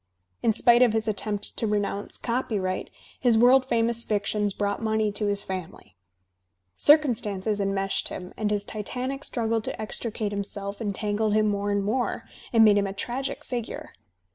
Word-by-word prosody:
In 225 - +3
spite 235 +2 +5
of 240 -3 +5
his 220 0 -1
attempt 205 -1 -2
to 225 - 0
renounce 205 -1 -2
copyright, 210 -6 -2 0.3
his 240 -4 +3
world 255 +3 +5
famous 235 -1 +1
fictions 205 -1 0
brought 205 +2 -2
money 220 -1 +1
to 205 +1 -2
his 200 0 -1
family. 185 - -7 0.8
Circumstances 220 -9 +3
en 195 0 0
meshed 195 0 -1
him, 180 0 -7
and 215 -1 -1
his 205 -1 -1
titanic 255 +6 -4
struggle 230 -2 0
to - - -6
extricate 215 -1 -3
himself 200 0 -5
entangled 210 0 0
him 215 0 +3
more 205 0 -1
and 205 -1 +1
more, 240 +5 -1 0.3
and 225 -2 +6
made 205 -1 +6
him 200 - 0
a 195 - -5
tragic 245 +7 -4
figure. 240 -3 -5
215 Hz, 165 wpm, -26 LUFS, 200-230 Hz, 0.8 s, and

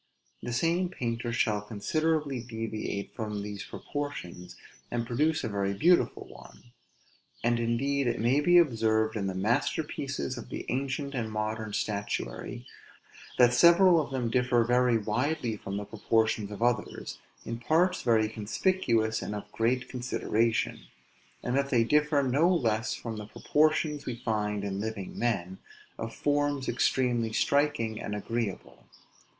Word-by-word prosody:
The 120 - -4
same 170 +8 +1
painter 120 -7 -3
shall 105 -3 +1
considerably 140 +7 -1
deviate 110 -3 -4
from 105 -2 -4
these 105 -1 -6
proportions, 145 -12 -6 0.3
and 120 -1 -2
produce 150 +7 +1
a - - -1
very 100 -2 -1
beautiful 175 - +3
one. 120 - -15 0.7
And, 120 0 +2
indeed, 130 +4 0
it 120 - 0
may 120 +6 +3
be 175 +4 +5
observed 110 -8 +3
in 100 -3 -1
the 95 - -3
masterpieces 130 +5 -1
of - - -10
the - - -5
ancient 140 +2 -2
and 115 -4 -3
modern 110 0 -3
statuary, 100 - -3 0.7
that 125 -1 +6
several 170 +4 +6
of - - -5
them 125 -4 -2
differ 125 -1 +3
very 125 0 +3
widely 120 +3 -1
from 100 -1 -5
the 105 - -4
proportions 110 -1 0
of 105 +2 -4
others, 120 0 -1 0.3
in 115 0 -4
parts 170 +9 +2
very 110 -2 +3
conspicuous 110 - 0
and 105 - -4
of 105 0 -7
great 125 +3 0
consideration; 115 -2 0 0.6
and 125 - -1
that 140 0 +1
they 120 -4 +4
differ 150 +3 +3
no 140 +7 +3
less 115 -9 +1
from 115 -2 -6
the 105 -1 -7
proportions 150 +3 +1
we 125 - -2
find 105 -3 -2
in 100 -1 -3
living 105 -2 -5
men, 95 -6 -1 0.4
of 115 0 -4
forms 145 0 0
extremely 120 -2 +1
striking 140 -4 +1
and 105 - -4
agreeable. 110 -1 -4
120 Hz, 145 wpm, -29 LUFS, 110-140 Hz, 0.7 s, that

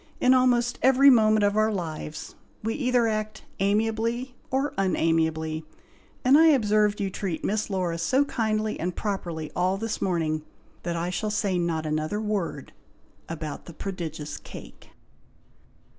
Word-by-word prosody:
In 255 - +5
almost 245 -2 +2
every 270 +2 +7
moment 215 -3 +4
of 205 0 +2
our 215 +1 +3
lives, 160 -5 -5 0.3
we 225 +1 -1
either 250 -4 +2
act 215 0 -3 0.2
amiably 225 +5 0 0.2
of 270 +2 0
unamiably, 160 -4 0 0.6
and 270 +4 +7
I 325 - +7
observed 215 -7 +3
you 195 -2 -1
treat 185 -4 -4
Miss 215 +1 -1
Laura 180 -4 -1
so 260 +12 +2
kindly 215 -4 -1
and 175 +2 -2
properly 170 -7 -4
all 185 +2 +1
this 225 +2 -3
morning, 160 -4 0 0.4
that 170 -1 -3
I 170 +2 -2
shall 215 +4 -2
say 200 -3 0
not 165 -2 -1
another 155 +6 -1
word 205 -10 -3 0.6
about 155 -2 -6
"THE 170 - -10
PRODIGIOUS 160 -5 -5
CAKE." - - -12
205 Hz, 145 wpm, -26 LUFS, 165-225 Hz, 0.6 s, every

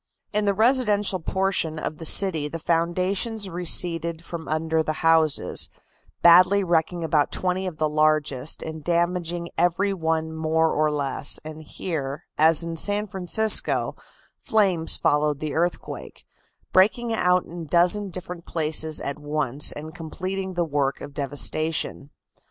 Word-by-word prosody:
In 210 0 0
the 200 -1 +1
residential 210 -4 +2
portion 185 -2 -1
of 155 0 -5
the 165 - -4
city 160 -4 +5
the 165 - -6
foundations 185 +6 -1
receded 170 -1 +1
from 165 -2 -7
under 160 +1 0
the 155 0 -2
houses, 160 -2 +2 0.5
badly 185 +4 +6
wrecking 170 0 0
about 155 -2 +1
twenty 185 +1 -2
of 170 -4 -6
the 155 - +1
largest 150 -2 0
and 160 -1 -7
damaging 175 0 -1
every 175 +4 +1
one 160 -2 -2
more 160 0 0
or 155 0 +1
less; 140 -1 0
and 155 0 -8
here, 150 -3 -5
as 160 +1 +4
in 165 0 -5
San 205 +5 -1
Francisco, 210 +2 +1 0.4
flames 195 -9 +2
followed 150 -1 +1
the 155 -1 -4
earthquake, 175 +2 -4 0.5
breaking 225 +5 +3
out 180 -4 +2
in 175 0 -9
a - - -7
dozen 180 +6 +2
different 180 -1 -5
places 155 -1 0
at 140 +1 -5
once 145 -2 -1
and 155 +2 -9
completing 185 +3 -5
the 175 -1 0
work 140 -3 -1
of 145 - -9
devastation. 145 +1 -1
165 Hz, 140 wpm, -24 LUFS, 155-185 Hz, 0.5 s, badly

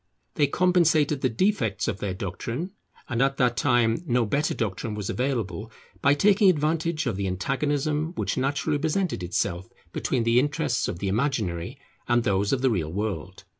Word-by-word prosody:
They 145 - +2
compensated 160 -4 +3
the 130 - +2
defects 115 - 0
of 100 - -2
their 95 -3 -3
doctrine, 115 - -4 0.4
and 120 -1 -1
at 135 0 +2
that 125 -2 +2
time 120 -1 +2
no 120 -2 +2
better 140 +8 0
doctrine 105 0 -3
was 105 -2 -3
available, 115 -6 -2 0.3
by 140 +1 +4
taking 200 +5 +5
advantage 160 0 0
of 115 -7 -1
the 100 -1 -1
antagonism 145 - -1
which - - -1
naturally 140 +3 0
presented 160 - -1
itself 90 0 -2 0.2
between 125 -4 0
the 115 +1 +4
interests 145 -2 0
of - - -4
the 100 - -3
imaginary 105 - -1 0.3
and 120 -1 +3
those 100 -1 +1
of 135 -1 0
the 130 - +4
real 80 -7 -1
world. 95 -2 -4
125 Hz, 170 wpm, -26 LUFS, 100-150 Hz, 0.4 s, taking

